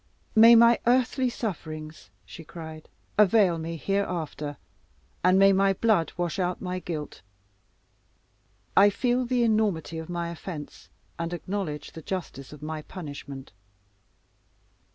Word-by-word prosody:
"May 230 Hz, +2 st, +8 dB
my 235 Hz, +1 st, +6 dB
earthly 255 Hz, +1 st, +2 dB
sufferings," 155 Hz, -9 st, -6 dB, 0.2 s
she 165 Hz, -, -11 dB
cried, 160 Hz, -1 st, -10 dB, 0.3 s
"avail 195 Hz, -4 st, +5 dB
me 165 Hz, +1 st, -4 dB
here 195 Hz, +5 st, 0 dB
after, 155 Hz, -4 st, -5 dB, 0.7 s
and 185 Hz, +1 st, +5 dB
may 195 Hz, 0 st, +6 dB
my 195 Hz, 0 st, +3 dB
blood 195 Hz, -6 st, +2 dB
wash 175 Hz, +1 st, -2 dB
out 180 Hz, -1 st, -1 dB
my 185 Hz, -1 st, -3 dB
guilt. 160 Hz, -5 st, -6 dB, 1.5 s
I 200 Hz, +1 st, +7 dB
feel 245 Hz, +4 st, 0 dB
the 245 Hz, 0 st, +1 dB
enormity 210 Hz, -8 st, 0 dB
of 160 Hz, -, -8 dB
my 170 Hz, -1 st, -3 dB
offence, 170 Hz, -3 st, -8 dB, 0.3 s
and 170 Hz, +1 st, -3 dB
acknowledge 175 Hz, -3 st, -4 dB
the 160 Hz, -, -9 dB
justice 160 Hz, -6 st, -6 dB
of 150 Hz, 0 st, -12 dB
my 155 Hz, 0 st, -4 dB
punishment. 145 Hz, -5 st, -9 dB
175 Hz, 130 wpm, -27 LUFS, 160-205 Hz, 1.5 s, May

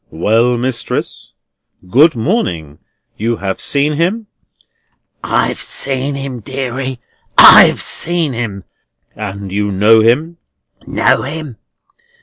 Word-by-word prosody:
"Well, 115 Hz, +8 st, +1 dB
mistress. 125 Hz, 0 st, -4 dB, 0.5 s
Good 145 Hz, -, +4 dB
morning. 90 Hz, -, -2 dB, 0.4 s
You 115 Hz, +2 st, -1 dB
have 95 Hz, -1 st, -4 dB
seen 145 Hz, +1 st, 0 dB
him?" 185 Hz, +9 st, -1 dB, 1.0 s
"I've -, -, -1 dB
seen 135 Hz, +1 st, -4 dB
him, 135 Hz, -2 st, -5 dB
deary; 130 Hz, +1 st, -5 dB, 0.4 s
I've -, -, +8 dB
seen 165 Hz, -4 st, -2 dB
him!" 110 Hz, -5 st, -5 dB, 0.5 s
"And 100 Hz, -2 st, -7 dB
you 105 Hz, +1 st, -1 dB
know 105 Hz, +4 st, +4 dB
him?" 150 Hz, +10 st, +1 dB, 0.5 s
"Know -, -, +1 dB
him! 145 Hz, -4 st, -6 dB
125 Hz, 105 wpm, -14 LUFS, 105-145 Hz, 1.0 s, I've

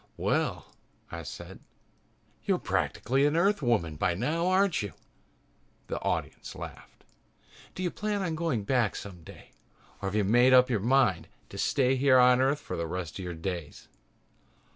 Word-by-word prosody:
"Well," -, -, -1 dB, 0.5 s
I 85 Hz, -, -5 dB
said, 75 Hz, -, -9 dB, 0.8 s
"you're -, -, +1 dB
practically 135 Hz, +5 st, 0 dB
an 145 Hz, -, 0 dB
Earthwoman 120 Hz, -, +1 dB
by 85 Hz, -, +1 dB
now, 155 Hz, -, -1 dB
aren't 185 Hz, -2 st, +2 dB
you?" 100 Hz, -2 st, -5 dB, 1.0 s
The -, -, -3 dB
audience -, -, -3 dB
laughed. -, -, -10 dB, 0.7 s
"Do 185 Hz, -, -4 dB
you 175 Hz, -, -1 dB
plan 210 Hz, -1 st, -2 dB
on 170 Hz, -3 st, -2 dB
going 160 Hz, -9 st, -1 dB
back 120 Hz, -1 st, +1 dB
someday 90 Hz, -5 st, -10 dB, 0.5 s
or 100 Hz, -, -2 dB
have 100 Hz, -, -5 dB
you 105 Hz, -, +2 dB
made 120 Hz, +6 st, +4 dB
up 125 Hz, 0 st, +6 dB
your 110 Hz, -, +1 dB
mind 120 Hz, -4 st, +2 dB, 0.2 s
to -, -, -9 dB
stay 135 Hz, -2 st, +2 dB
here 130 Hz, 0 st, +5 dB
on 125 Hz, 0 st, +6 dB
Earth 135 Hz, +3 st, +2 dB
for -, -, -6 dB
the 85 Hz, 0 st, -3 dB
rest 90 Hz, +1 st, -5 dB
of -, -, -5 dB
your 90 Hz, -1 st, -5 dB
days?" 85 Hz, -2 st, -6 dB
125 Hz, 160 wpm, -28 LUFS, 95-150 Hz, 1.0 s, up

